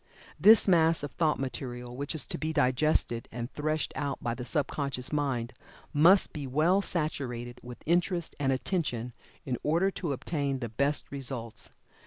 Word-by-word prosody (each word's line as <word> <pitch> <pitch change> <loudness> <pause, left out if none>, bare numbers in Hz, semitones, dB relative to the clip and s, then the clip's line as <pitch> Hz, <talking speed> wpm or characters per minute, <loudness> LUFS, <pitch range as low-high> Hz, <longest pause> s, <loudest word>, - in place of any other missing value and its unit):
This 220 0 +7
mass 165 -4 +4
of 145 - -4
thought 160 -3 +1
material 125 -2 -5
which 140 +4 -3
is 155 - 0
to - - -4
be 155 +1 -1
digested, 130 -4 +1
and 120 +2 -5
threshed 155 +1 -1
out 140 -2 -2
by 120 - -2
the 125 - -6
sub 145 +3 0
conscious 140 -2 -2
mind, 130 -5 -1 0.4
must 170 +6 +5
be 145 -3 -5
well 160 +9 +3
saturated 125 -9 -3
with 125 0 -10
interest 175 +1 +1
and 135 -2 +2
attention, 130 -4 -1 0.3
in 130 -4 -2
order 170 +6 +2
to 170 -5 -3
obtain 140 0 -2
the 120 -3 -4
best 140 +6 0
results. 130 -5 -4
140 Hz, 165 wpm, -29 LUFS, 125-160 Hz, 0.4 s, This